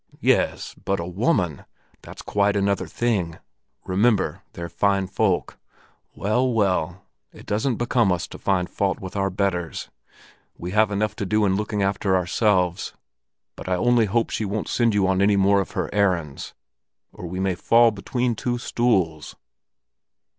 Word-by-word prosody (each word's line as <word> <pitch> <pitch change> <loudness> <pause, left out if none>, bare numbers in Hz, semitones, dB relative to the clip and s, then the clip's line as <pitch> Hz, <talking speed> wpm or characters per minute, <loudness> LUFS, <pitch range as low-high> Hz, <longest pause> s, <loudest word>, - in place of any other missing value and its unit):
"Yes, - - +1
but 100 -1 -1
a 85 - -3
woman! 90 - 0 0.4
That's - - -11
quite 100 0 +1
another 100 0 0
thing. 100 -9 -1 0.5
Remember 95 -3 +1
they're 85 0 -6
fine 100 +3 +1
folk. 95 0 -1 0.6
Well, 125 +5 +1
well, 95 -4 0 0.3
it - - -14
doesn't 110 +5 0
become 120 -3 +1
us 90 -1 -1
to - - -10
find 95 -2 0
fault 95 0 -1
with 95 0 -8
our 100 -1 0
betters; 90 -3 -2 0.7
we 90 +1 -6
have 110 +1 +3
enough 105 +1 -1
to 105 - -2
do 105 +2 +2
in 95 -1 +2
looking 105 0 -1
after 95 0 +1
ourselves. 90 -1 +1 0.6
But - - -8
I 90 - +2
only 120 +4 +3
hope 115 +3 0
she - - -2
won't 105 +1 -3
send 115 -3 +2
you 100 -2 +3
on 95 0 +1
any 100 +1 +4
more 100 0 +4
of 95 - -7
her - - 0
errands, 90 -8 -1 0.6
or 90 - -8
we 95 +2 -5
may 95 -1 +1
fall 115 +6 +4
between 120 +4 -2
two 120 +2 -2
stools." 95 -11 0
100 Hz, 160 wpm, -23 LUFS, 90-110 Hz, 0.7 s, any